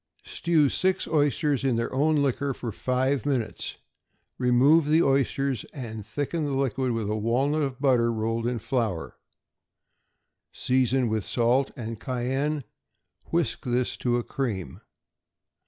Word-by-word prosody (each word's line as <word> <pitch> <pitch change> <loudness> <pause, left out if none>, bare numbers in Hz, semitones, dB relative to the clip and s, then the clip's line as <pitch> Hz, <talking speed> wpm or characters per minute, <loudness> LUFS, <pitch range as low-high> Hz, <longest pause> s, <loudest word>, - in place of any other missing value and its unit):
= - - -36
Stew 160 -4 +2
six 185 +6 0
oysters 145 -2 +1
in 130 -3 +2
their 115 +2 -2
own 150 +2 +2
liquor 140 0 0
for 115 - -5
five 130 +5 0
minutes; 130 -6 -2 0.6
remove 135 +6 +4
the 160 +3 +4
oysters, 135 -2 +1
and 110 -6 -6
thicken 145 +9 -3
the 140 -2 -1
liquid 135 -1 0
with 115 -2 -2
a 105 - -1
walnut 130 +8 +1
of 135 -3 -2
butter 125 -4 +3
rolled 115 +1 -1
in 120 0 -1
flour; 110 -7 -2 1.3
season 130 0 +1
with 110 -2 -1
salt 125 +5 +1
and 115 -3 -6
cayenne; 135 +4 -1 0.6
whisk 170 -2 -1
this 125 -1 0
to 120 -1 +1
a 120 - -1
cream. 115 -11 -4
130 Hz, 140 wpm, -26 LUFS, 115-140 Hz, 1.3 s, remove